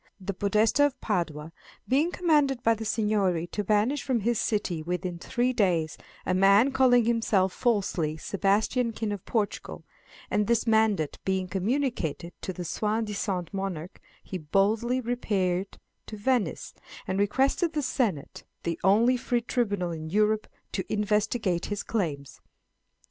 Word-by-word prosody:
The 195 +1 -4
Podesta 210 +8 +2
of 285 - -9
Padua 165 -6 -2 0.4
being 290 +7 +2
commanded 295 -8 +2
by 230 - +4
the 225 0 -5
Seignory 210 -6 +1
to 210 - -2
banish 215 +8 +1
from 255 -4 0
his 235 +1 +1
city 190 -6 -1
within 180 +1 -3
three 245 +7 0
days 170 -8 +1 0.3
"a 185 - +1
man 200 +7 +5
calling 250 -3 +4
himself 215 -5 +2
falsely 185 -9 0
Sebastian, 210 +7 0
King 220 -1 -3
of 205 -3 -5
Portugal," 215 -3 -2 0.5
and 210 0 +1
this 235 0 +2
mandate 220 -8 +2
being 190 -1 -1
communicated 190 - -2
to - - -3
the 180 -1 -6
soi 215 +6 -1
disant 200 -4 -3
monarch, 185 -4 -5 0.2
he 185 - -5
boldly 210 +10 +1
repaired 200 -6 -1 0.3
to 215 - -7
Venice, 245 +1 -1 0.3
and 190 +1 -1
requested 270 - +1
the 300 -2 -1
Senate, 220 - -2 0.2
the 170 -1 -2
only 225 +7 +4
free 240 0 0
tribunal 205 -7 -1
in 160 -1 -6
Europe, 215 +3 +2 0.2
to 190 - -2
investigate 210 -3 0
his 205 -1 -3
claims. 145 - -3
210 Hz, 145 wpm, -27 LUFS, 185-235 Hz, 0.5 s, man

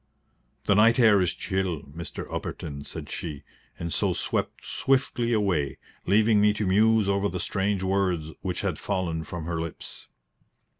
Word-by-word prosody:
"The 100 - +4
night 115 +3 +5
air 110 -5 +6
is 90 - +2
chill, 95 -4 -2
Mr. 80 +4 -7
Upperton," 70 -2 -5
said - - -7
she, 75 -5 -5 0.3
and 85 -2 -4
so - - +1
swept - - -2
swiftly 130 -3 +1
away, 95 - +1 0.3
leaving 105 +2 +4
me 105 0 +5
to 105 0 -2
muse 110 +2 +4
over 100 +1 +1
the 90 - -4
strange 95 +2 0
words 95 -5 0
which - - -2
had - - -2
fallen 85 -4 -2
from 85 -1 -6
her 85 -1 -2
lips. 85 -1 -8
95 Hz, 155 wpm, -26 LUFS, 85-105 Hz, 0.3 s, air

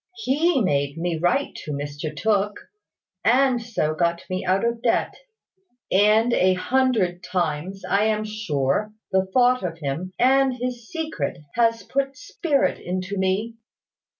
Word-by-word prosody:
He 335 -4 +1
made 140 -5 0
me 165 -1 -2
write 180 - +1
to 150 - -7
Mr 145 +2 -4
Tooke, 205 +3 -1 0.5
and 250 +1 +3
so 215 -10 -1
got 170 +1 0
me 185 +1 -2
out 190 +4 +1
of 235 0 -1
debt; 235 - +1 0.8
and 215 +4 +4
a 185 -3 +3
hundred 215 -5 +1
times, 180 +1 -2
I 200 +2 +2
am 215 -1 +1
sure, 210 -2 -1 0.2
the 190 0 +2
thought 250 +2 +4
of 165 -3 -4
him 155 +5 -4
and 265 +1 +4
his 245 -1 -5
secret 315 - -3 0.2
has 230 -1 +2
put 275 0 -2
spirit 340 -8 0
into 185 +2 -4
me. 200 +5 -1
210 Hz, 140 wpm, -23 LUFS, 175-245 Hz, 0.8 s, and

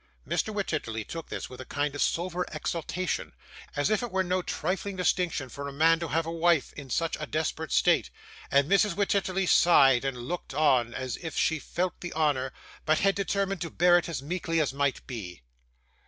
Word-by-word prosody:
Mr. 220 - 0
Wititterly 155 - -2
told 165 -1 -7
this - - -4
with 125 - -10
a - - -6
kind 145 +1 -2
of 145 - -4
sober 180 +1 0
exultation, 165 +3 -3 0.4
as 145 +8 +1
if 215 - +2
it 240 - -3
were 190 0 +1
no 185 0 0
trifling 190 +4 -3
distinction 180 -6 0
for 140 +3 -7
a - - -5
man 165 +3 +4
to 170 - -3
have 165 +1 0
a 165 - -4
wife 165 -3 +2
in 140 -3 -9
such 165 +6 0
a 150 - -4
desperate 155 0 -2
state, - - +3 0.4
and 140 0 +3
Mrs. 200 0 +3
Wititterly 195 -1 +1
sighed 135 -9 +6
and 135 -2 -2
looked 130 +9 -5
on, 130 -6 +3
as 130 -1 -3
if 165 -2 -6
she 160 -1 +2
felt 180 +4 -3
the 175 - -5
honour, 145 -5 +1 0.3
but 155 0 +3
had 195 0 +4
determined 195 -2 -1
to 170 - -3
bear 175 +2 +4
it 175 - -6
as 140 -5 -4
meekly 165 +1 -1
as 145 -4 +1
might 140 -1 -1
be. 90 - -7
165 Hz, 200 wpm, -28 LUFS, 140-180 Hz, 0.4 s, sighed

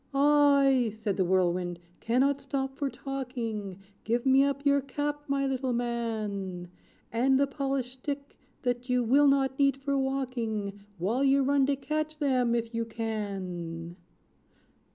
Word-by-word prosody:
"I," 280 -3 +5
said 215 -3 -2
the 190 - +3
Whirlwind, 180 -1 +1 0.2
"cannot 270 +4 +1
stop 270 -1 -3
for 280 -1 -1
talking! 240 -9 -5 0.3
Give 235 +3 0
me 265 +1 +6
up 280 0 -1
your 280 0 +4
cap, 290 +2 -3
my 275 0 +1
little 265 -1 -1
man; 215 -7 -3 0.4
And 260 +3 +3
the 280 - +4
polished 270 -2 -3
stick, 280 +1 -5 0.3
that 245 0 -2
you 250 0 +2
will 275 +5 +5
not 270 -1 +2
need 275 -1 +3
for 280 +1 -2
walking. 235 -7 -2
While 215 +10 0
you 275 0 +4
run 275 0 +3
to 280 - +2
catch 305 +2 -3
them, 255 -5 +2
if 230 0 -2
you 230 0 0
can! 190 -7 -5
255 Hz, 145 wpm, -29 LUFS, 220-275 Hz, 0.4 s, me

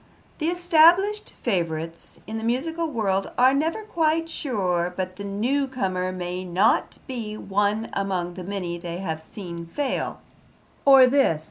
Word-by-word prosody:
'The 310 - 0
established 350 +4 +4
favourites 165 -6 -3
in 220 +1 -4
the - - -7
musical 320 +8 -1
world 195 -7 -1
are 255 +2 +6
never 320 +9 0
quite 330 -5 +1
sure 185 - -1
but 185 -1 -3
the 200 - -6
new 240 +8 0
comer 185 -8 -2
may 180 0 -4
not 180 +1 +2
be 225 -5 -5
one 205 +3 0
among 185 -3 -2
the 185 0 -7
many 180 -3 -4
they 170 0 -5
have 160 -4 -4
seen 170 -1 -8
fail'; 270 +9 -2 0.7
or 270 -2 +9
this? 255 - +3
205 Hz, 145 wpm, -24 LUFS, 180-280 Hz, 0.7 s, or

